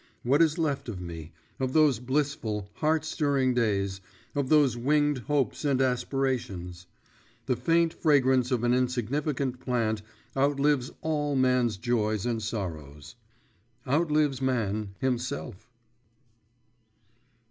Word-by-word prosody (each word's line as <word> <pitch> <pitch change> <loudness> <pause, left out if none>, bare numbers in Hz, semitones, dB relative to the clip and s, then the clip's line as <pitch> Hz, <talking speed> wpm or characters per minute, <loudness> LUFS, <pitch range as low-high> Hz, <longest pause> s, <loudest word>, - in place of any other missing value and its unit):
What 140 +6 +3
is 160 -2 +3
left 145 -6 -1
of 100 -5 -5
me, 85 -2 -8 0.3
of 130 -1 -1
those 150 -7 +4
blissful, 125 -6 -2
heart 155 0 +1
stirring 140 -5 +1
days, 100 -5 0 0.3
of 140 -3 -1
those 145 -6 +4
winged 145 +3 +1
hopes 135 0 -1
and 140 -3 +1
aspirations? 125 -9 -2 0.6
The 125 - +1
faint 165 +3 +2
fragrance 130 -5 +3
of 125 -3 0
an 120 0 +3
insignificant 130 +2 -1
plant 115 -4 -1 0.3
outlives 140 -1 +2
all 150 -2 -1
man's 125 -4 +2
joys 110 -2 0
and 115 -2 -1
sorrows 80 -8 -6 0.7
outlives 150 -2 +1
man 110 -6 -1
himself. 120 - -3
125 Hz, 115 wpm, -28 LUFS, 110-145 Hz, 0.7 s, those